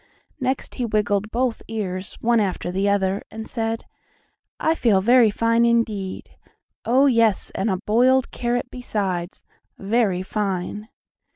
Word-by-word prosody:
Next 260 +1 -2
he 245 - -2
wiggled 210 -1 0
both 240 0 -1
ears, 190 -4 -4
one 235 0 +3
after 185 -3 -1
the 195 +2 +1
other, 195 -1 +1
and 220 0 -8
said: 225 -1 -3 0.7
"I 320 - +2
feel 225 -11 +3
very 235 +3 +5
fine 230 +2 +2
indeed! 225 -5 0 0.5
Oh, 260 +4 +4
yes, 230 -6 +2
and 200 +3 -1
a 190 - 0
boiled 245 +6 +2
carrot 245 +1 -2
besides, 195 -7 -3 0.4
very 200 -3 0
fine!" 205 +1 -3
220 Hz, 130 wpm, -22 LUFS, 195-235 Hz, 0.7 s, very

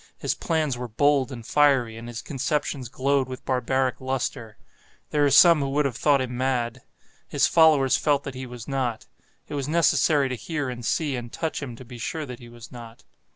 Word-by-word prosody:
His - - -1
plans 155 -7 -1
were 125 - -4
bold 140 +3 +2
and 120 -3 -8
fiery, 135 -6 +3
and 115 +1 -9
his 120 -1 -7
conceptions 140 -2 -2
glowed 135 +1 0
with 130 - -8
barbaric 130 0 0
lustre. 125 -4 -3 0.5
There 150 -1 +2
are 145 - +4
some 165 +4 +7
who 140 -1 -1
would 145 +2 +1
have 130 -4 -1
thought 140 +2 +3
him 125 -1 -4
mad. 125 -1 -1 0.5
His - - +2
followers 155 -5 +4
felt 145 -2 +1
that 135 - -6
he 130 0 -7
was 120 -2 -9
not. 130 -3 -2 0.4
It - - -8
was 140 -2 -3
necessary 155 -3 +3
to 130 - -2
hear 145 +3 -4
and 120 -1 -8
see 145 +4 0
and 120 -1 -6
touch 160 -2 -3
him 125 -4 -6
to 130 - -12
be 120 0 -11
sure 155 +6 -4
that 125 -3 -9
he 120 - -12
was 120 -1 -13
not. 115 -2 -11
130 Hz, 205 wpm, -25 LUFS, 120-145 Hz, 0.5 s, some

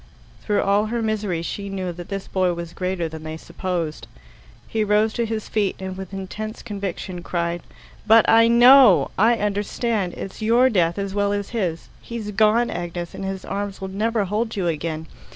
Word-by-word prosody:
Through 210 -1 +1
all 200 +2 +2
her 235 +2 -2
misery 210 -6 -1
she 200 +3 -5
knew 190 -2 -3
that 175 0 -9
this 195 -1 -4
boy 185 -2 +1
was 170 0 -7
greater 180 -2 -2
than 160 0 -8
they 155 0 -6
supposed. 170 -2 -4 0.6
He 220 -1 0
rose 210 +1 +2
to 235 -1 -1
his 220 -1 -3
feet, 205 -3 0
and 190 0 -5
with 190 -1 -8
intense 205 +3 -6
conviction 195 -4 -5
cried: 170 0 -2 0.5
"But 225 +1 +6
I 230 0 +6
know 240 -2 +7
I 225 +4 +4
understand. 205 -1 -1
It's 195 - -7
your 240 +4 +4
death 170 -5 +2
as 200 -1 -3
well 205 0 +1
as 205 -1 -3
his. 180 -8 -2
He's 225 -3 -6
gone, 215 +3 +3
Agnes, 175 0 -5
and - - -6
his 190 0 -4
arms 200 -1 -4
will 190 -1 -5
never 215 +2 0
hold 220 +4 -2
you 195 -3 -1
again. 160 0 -2
200 Hz, 185 wpm, -22 LUFS, 180-215 Hz, 0.6 s, know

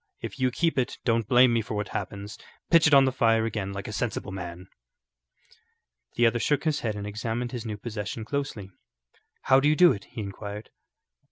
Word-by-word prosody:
If - - -7
you 130 0 +3
keep 160 +2 0
it, 125 - -2
don't 115 -3 +1
blame 125 0 +5
me 115 - +2
for 110 0 -6
what 105 -1 -3
happens. 100 +1 -5 0.4
Pitch 165 -2 +6
it 150 - +3
on 135 -1 +7
the 130 - +2
fire 115 -3 +2
again 100 -3 -3
like 100 0 -6
a 105 - -6
sensible 105 -4 -3
man." 90 -1 -7 1.5
The 120 - +3
other 115 +1 +2
shook 145 +4 +1
his 155 -2 0
head 110 -3 -2
and 100 0 -5
examined 115 +3 -3
his 120 -2 -5
new 105 -1 -4
possession 110 0 -5
closely. 125 -8 -4 0.7
"How 130 0 +5
do 145 +2 +3
you 155 - +3
do 175 +1 +7
it?" 100 -5 -5
he 120 -3 -7
inquired. 100 +1 -7
115 Hz, 200 wpm, -26 LUFS, 105-130 Hz, 1.5 s, on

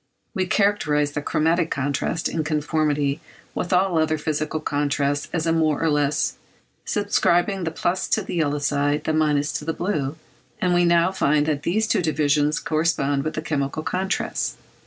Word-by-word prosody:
We 190 -4 -1
characterised 150 -9 +1
the 145 - -2
chromatic 165 +2 +1
contrast, 140 +4 -1
in 160 - -2
conformity 150 -1 0 0.3
with 175 - -3
all 180 -2 +3
other 155 0 +1
physical 155 +1 -2
contrasts 145 -1 -1
as 165 -2 -1
a 165 - +2
more 160 -2 +1
and 160 -2 +2
less; 145 0 0 0.6
ascribing 195 -2 +1
the - - 0
plus 175 +3 -1
to - - +1
the - - -6
yellow 150 -4 0
side, 145 +1 0
the 160 - -1
minus 150 -2 +1
to - - -10
the 165 - -1
blue; 155 -7 -2 0.4
and 180 -1 +1
we 175 0 +4
now 170 +1 +4
find 150 -5 +2
that 150 -2 -1
these 215 +8 +1
two 220 - +1
divisions 150 -1 +1
correspond 155 -3 0
with 155 - -3
the 155 - -3
chemical 145 0 -2
contrasts. 190 +3 -2
155 Hz, 170 wpm, -23 LUFS, 145-170 Hz, 0.6 s, we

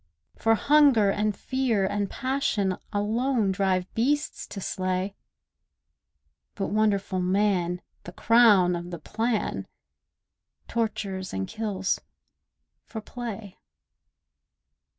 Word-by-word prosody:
For 225 0 +3
hunger, 275 -7 +5
and 210 0 0
fear, 255 -7 0
and 205 0 -1
passion 255 -8 0 0.2
Alone 220 +1 +1
drive 190 -2 +1
beasts 290 +6 0
to 200 - -7
slay, 185 +1 -2 1.4
But 195 - -2
wonderful 205 -3 +1
man, 180 -2 +1 0.2
the 175 - -7
crown 205 -4 +5
of 175 0 -6
the 175 - -5
plan, 220 +5 -2 1.0
Tortures, 200 -5 -3
and 95 0 -2
kills, 200 -4 -2 0.8
for 220 - -7
play. 220 -3 -7
205 Hz, 95 wpm, -26 LUFS, 190-230 Hz, 1.4 s, hunger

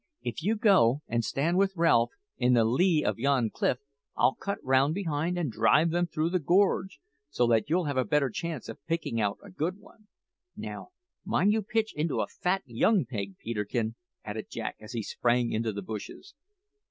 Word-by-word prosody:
If 120 +2 -4
you 210 +7 +1
go 165 - +4
and 115 0 0
stand 165 +10 0
with 195 0 +2
Ralph 120 -9 +4 0.3
in 125 0 +2
the 115 - +5
lee 155 +7 +3
of - - 0
yon 130 -4 +2
cliff 125 - 0 0.4
I'll 130 - +4
cut 200 0 -4
round 135 +4 +3
behind 170 -2 -1
and 160 -8 -1
drive 155 +9 +3
them 175 +1 +1
through 160 +1 -1
the 185 - +2
gorge, 185 +2 +2 0.3
so 125 -4 +1
that 115 +3 +2
you'll 175 +3 +2
have 140 -3 -2
a 130 - +3
better 135 +3 +1
chance 165 -2 -4
of 115 - -9
picking 160 -9 -1
out 100 -1 0
a - - -12
good 165 - -2
one. 210 +1 -20 0.5
Now, - - -6 0.4
mind 205 +2 +2
you 220 - +1
pitch 220 +1 -1
into 155 0 -1
a - - +1
fat 190 +2 -1
young 165 - +2
pig, 100 -6 -5
Peterkin!" 110 0 -2 0.3
added 105 +1 -5
Jack 115 - -5
as 110 +3 -10
he 115 -2 -2
sprang 120 +2 +1
into 110 0 -1
the 100 -1 -6
bushes. 110 - -8
140 Hz, 190 wpm, -28 LUFS, 115-175 Hz, 0.5 s, the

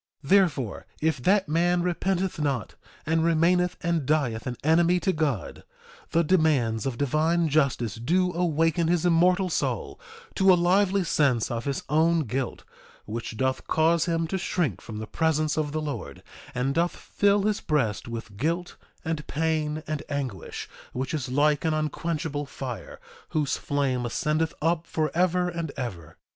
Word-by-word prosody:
2:38 140 - -10
Therefore 150 - +2
if 155 -4 0
that 195 +6 +3
man 175 +3 +2
repenteth 180 0 -1
not, 140 -7 -1 0.3
and 160 +1 +2
remaineth 170 +2 +2
and 170 -5 0
dieth 135 -8 0
an 125 - -3
enemy 170 +3 +4
to 190 +1 0
God, 150 - -2 0.5
the 170 - +2
demands 145 - +2
of 125 -3 -3
divine 160 +5 +2
justice 140 -7 +1
do 180 +9 +1
awaken 165 -1 +1
his 175 0 +1
immortal 180 +2 +4
soul 175 - -2 0.3
to 190 -1 +5
a - - +7
lively 190 +2 +3
sense 135 -10 +1
of 115 -1 -3
his 140 -2 -2
own 160 +2 +3
guilt, 130 -1 -3 0.4
which 110 +1 -5
doth 130 +2 -1
cause 160 +1 +3
him 165 -1 0
to 190 +4 -2
shrink 170 - -1
from 110 - -8
the 110 - -4
presence 155 +3 0
of 150 -2 -1
the 155 +1 -2
Lord, 145 -2 -6 0.3
and 130 +2 0
doth 170 +3 +1
fill 200 0 +1
his 210 0 0
breast 120 -10 0
with 115 -3 -7
guilt, 170 - -2 0.3
and 160 -2 -3
pain, 155 0 -1
and 155 -1 -3
anguish, 130 - -4 0.3
which 130 +3 -3
is 140 -5 -2
like 145 +2 +2
an 160 -1 +1
unquenchable 155 -1 -2
fire, 130 -6 -7 0.3
whose 150 -3 0
flame 130 -4 -1
ascendeth 155 +6 0
up 165 0 +1
forever 180 +3 +1
and 170 -3 -3
ever. 100 - -6
155 Hz, 155 wpm, -26 LUFS, 135-170 Hz, 0.5 s, a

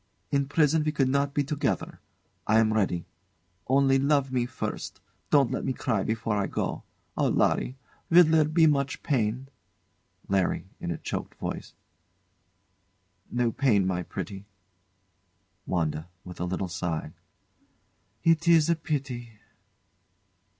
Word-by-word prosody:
In 140 -1 +1
prison 150 +1 +3
we 150 - 0
could 135 -3 +1
not 140 +1 +1
be 145 0 +1
together. 145 0 -2 0.5
I 110 - +4
am 110 -1 +4
ready. 95 -5 0 0.6
Only 135 0 +4
love 140 -1 +2
me 125 -2 0
first. 125 - -5 0.3
Don't 140 -4 +4
let - - -2
me 130 - -1
cry 110 -5 -1
before 110 +1 -1
I 100 - 0
go. - - -3 0.3
Oh! - - +2
Larry, 130 - +1 0.3
will 175 +2 +8
there 160 -1 +4
be 160 +2 +4
much 140 -2 +1
pain? 125 -1 0 0.8
LARRY. 95 -1 0
[In - - -4
a 85 - -2
choked - - -5
voice] - - -6 1.5
No 120 -1 +1
pain, 110 -7 +2
my 90 -1 0
pretty. 95 +2 -6 1.2
WANDA. 80 -2 -1 0.2
[With 90 -1 -9
a 90 - -1
little 95 +1 -2
sigh] 85 -2 -3 1.1
It 165 0 +3
is 165 -1 +5
a - - +3
pity. 135 -7 -4
130 Hz, 135 wpm, -27 LUFS, 100-145 Hz, 1.5 s, will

